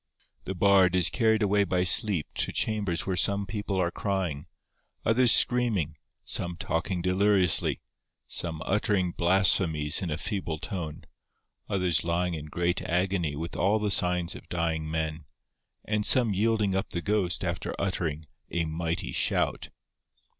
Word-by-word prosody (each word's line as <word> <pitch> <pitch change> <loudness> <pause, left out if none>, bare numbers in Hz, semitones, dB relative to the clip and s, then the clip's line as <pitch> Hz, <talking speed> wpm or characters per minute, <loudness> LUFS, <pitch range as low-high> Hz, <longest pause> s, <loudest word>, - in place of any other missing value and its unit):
The 95 - -4
Bard 95 -1 +4
is 90 -2 +3
carried 110 -2 +2
away 100 0 +2
by 90 -2 0
sleep 95 -3 +4
to - - -1
chambers 100 -6 -1
where 95 - -1
some 100 +2 +1
people 100 -1 -3
are 85 -1 0
crying, 90 -9 -3 0.6
others 120 +2 +5
screaming, 110 - +2 0.3
some 85 0 -3
talking 85 +2 -2
deliriously, 95 -1 +3 0.5
some 80 -3 -3
uttering 100 -3 0
blasphemies 85 -4 +3
in 90 - -3
a 75 - -2
feeble 85 -3 -4
tone, 85 -5 -6 0.7
others 90 -4 0
lying 85 +1 -1
in 75 -2 -6
great 85 +3 -1
agony 90 -3 -1
with 80 +3 -6
all 100 +3 +2
the 105 -1 -1
signs 90 -2 +2
of - - -12
dying 80 -2 -2
men, 80 -1 -3 0.6
and 105 0 -1
some 115 -1 +3
yielding 105 0 +1
up 95 0 -2
the 85 - -4
ghost 100 -4 0
after - - -3
uttering 80 -5 -2 0.2
'a 85 -1 -1
mighty 80 +1 -3
shout. - - 0
90 Hz, 145 wpm, -27 LUFS, 85-100 Hz, 0.7 s, others